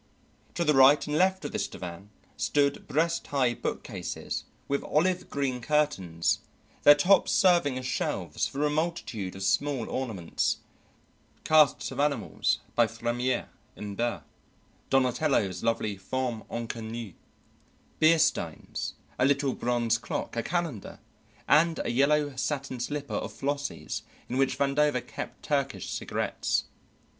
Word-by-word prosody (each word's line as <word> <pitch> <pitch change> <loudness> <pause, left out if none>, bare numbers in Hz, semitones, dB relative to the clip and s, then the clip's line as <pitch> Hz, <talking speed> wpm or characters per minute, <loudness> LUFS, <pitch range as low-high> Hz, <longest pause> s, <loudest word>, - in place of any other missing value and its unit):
To 170 - +1
the 150 -2 +3
right 135 +2 +6
and 150 - -2
left 185 +3 +2
of - - -3
this - - -1
divan 90 +3 -8 0.3
stood 140 -1 +1
breast 165 +4 0
high 130 -4 +2
bookcases - - -4 0.2
with 140 0 -1
olive 180 +4 +1
green 130 -3 -1
curtains, 115 - +1 0.4
their 145 - +9
tops 180 +7 +4
serving 170 -8 +4
as 130 - -5
shelves 130 - -1
for 145 +2 -1
a 150 - +1
multitude 150 - -2
of 95 - -6
small 130 +5 +1
ornaments, 110 -10 -1 0.9
casts 155 -2 +4
of - - -6
animals 140 -6 +1 0.2
by 120 -1 +4
Fremiet 120 +3 -1 0.3
and 105 -1 -6
Barye, 120 +2 -1 0.7
Donatello's 130 - +2
lovely 115 -3 0
femme 120 +3 -3
inconnue, 115 -2 -5 0.9
beer 160 +1 +6
steins, 155 - -1 0.2
a 130 - +4
little 140 -1 +2
bronze 120 -2 +1
clock, 115 - -4
a 115 - 0
calendar, 165 - -3 0.5
and 160 +2 +4
a - - 0
yellow 145 +2 +2
satin 130 -1 -2
slipper 145 +3 -4
of - - -2
Flossie's 145 +1 -3 0.3
in 125 - -3
which 135 -1 +2
Vandover 140 -2 +2
kept 145 - -7
Turkish 140 -2 -1
cigarettes. - - -1
135 Hz, 130 wpm, -28 LUFS, 115-150 Hz, 0.9 s, their